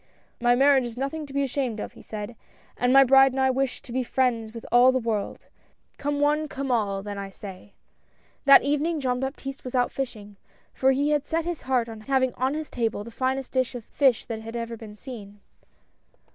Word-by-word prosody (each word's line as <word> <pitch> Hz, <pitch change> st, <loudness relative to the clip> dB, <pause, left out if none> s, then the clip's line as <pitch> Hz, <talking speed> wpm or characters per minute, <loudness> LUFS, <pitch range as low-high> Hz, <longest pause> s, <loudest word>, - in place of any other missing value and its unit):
" -, -, -35 dB
My 245 Hz, -, +6 dB
marriage 270 Hz, 0 st, +5 dB
is 240 Hz, 0 st, -7 dB
nothing 285 Hz, +3 st, -3 dB
to -, -, -12 dB
be 280 Hz, 0 st, +1 dB
ashamed 255 Hz, -4 st, -2 dB
of," -, -, -6 dB
he -, -, -14 dB
said, 215 Hz, +2 st, -7 dB, 0.2 s
" -, -, -32 dB
and 245 Hz, 0 st, +2 dB
my 275 Hz, +1 st, +8 dB
bride 270 Hz, 0 st, +6 dB
and 265 Hz, -, -2 dB
I 265 Hz, 0 st, +3 dB
wish 265 Hz, 0 st, -2 dB
to -, -, -12 dB
be 260 Hz, +2 st, 0 dB
friends 240 Hz, -3 st, 0 dB
with 230 Hz, 0 st, -9 dB
all 245 Hz, +2 st, +7 dB
the 260 Hz, -, +1 dB
world 225 Hz, -4 st, -3 dB, 0.3 s
— -, -, -41 dB
come 290 Hz, 0 st, -1 dB
one, 300 Hz, +1 st, +2 dB
come 270 Hz, -2 st, -4 dB
all, 200 Hz, -4 st, 0 dB
then, 205 Hz, -1 st, -5 dB
I 195 Hz, 0 st, -5 dB
say." 195 Hz, 0 st, -11 dB, 0.7 s
That 275 Hz, 0 st, +8 dB
evening 295 Hz, +3 st, 0 dB
Jean 250 Hz, -2 st, -1 dB
Baptiste 270 Hz, 0 st, -5 dB
was 255 Hz, 0 st, -6 dB
out 245 Hz, -1 st, +2 dB
fishing, 210 Hz, -7 st, -6 dB, 0.4 s
for 265 Hz, 0 st, +3 dB
he 285 Hz, +3 st, +1 dB
had 295 Hz, -1 st, 0 dB
set 325 Hz, 0 st, -1 dB
his 345 Hz, -2 st, -3 dB
heart 245 Hz, -3 st, +2 dB
on 220 Hz, -1 st, -9 dB
having 260 Hz, +1 st, +1 dB
on 260 Hz, +3 st, -1 dB
his 310 Hz, 0 st, -5 dB
table 225 Hz, -3 st, -1 dB
the 235 Hz, -, -10 dB
finest 260 Hz, +2 st, -2 dB
dish 255 Hz, -1 st, 0 dB
of 235 Hz, -3 st, -7 dB
fish 265 Hz, -5 st, +2 dB
that 225 Hz, -2 st, -5 dB
had 225 Hz, +1 st, -8 dB
ever 230 Hz, 0 st, -4 dB
been 215 Hz, -2 st, -11 dB
seen. 210 Hz, -4 st, -10 dB
255 Hz, 225 wpm, -25 LUFS, 225-275 Hz, 0.7 s, my